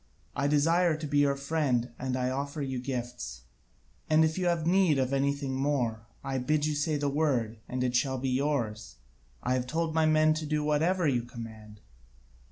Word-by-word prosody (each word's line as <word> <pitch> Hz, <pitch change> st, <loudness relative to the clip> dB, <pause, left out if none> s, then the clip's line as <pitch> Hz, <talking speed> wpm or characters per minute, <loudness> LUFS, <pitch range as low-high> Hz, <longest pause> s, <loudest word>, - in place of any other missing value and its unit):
I 140 Hz, -, +1 dB
desire 165 Hz, +3 st, +3 dB
to 155 Hz, -, -5 dB
be 145 Hz, 0 st, +1 dB
your 140 Hz, -1 st, +3 dB
friend 140 Hz, -4 st, 0 dB
and 130 Hz, 0 st, -2 dB
I 125 Hz, 0 st, 0 dB
offer 140 Hz, +2 st, -3 dB
you 130 Hz, -2 st, -3 dB
gifts; 120 Hz, -, -5 dB, 0.7 s
and 155 Hz, +1 st, +5 dB
if 160 Hz, 0 st, -1 dB
you 185 Hz, -1 st, 0 dB
have 170 Hz, -2 st, +1 dB
need 180 Hz, -4 st, +4 dB
of 130 Hz, 0 st, 0 dB
anything 140 Hz, 0 st, 0 dB
more, 125 Hz, -5 st, -1 dB, 0.2 s
I 135 Hz, -1 st, -2 dB
bid 150 Hz, +4 st, +1 dB
you 155 Hz, -, 0 dB
say 150 Hz, +1 st, 0 dB
the 145 Hz, 0 st, -1 dB
word, 135 Hz, -7 st, 0 dB
and 125 Hz, 0 st, -2 dB
it 125 Hz, -1 st, 0 dB
shall 130 Hz, +1 st, +1 dB
be 130 Hz, +1 st, -2 dB
yours. 125 Hz, -, -1 dB, 0.5 s
I 125 Hz, -, +1 dB
have 125 Hz, -1 st, -1 dB
told 160 Hz, +3 st, -1 dB
my 160 Hz, -1 st, +3 dB
men 155 Hz, 0 st, +4 dB
to 155 Hz, 0 st, -4 dB
do 150 Hz, 0 st, 0 dB
whatever 160 Hz, +4 st, +2 dB
you 125 Hz, -4 st, +2 dB
command." 110 Hz, -3 st, -10 dB
140 Hz, 190 wpm, -29 LUFS, 125-155 Hz, 0.7 s, and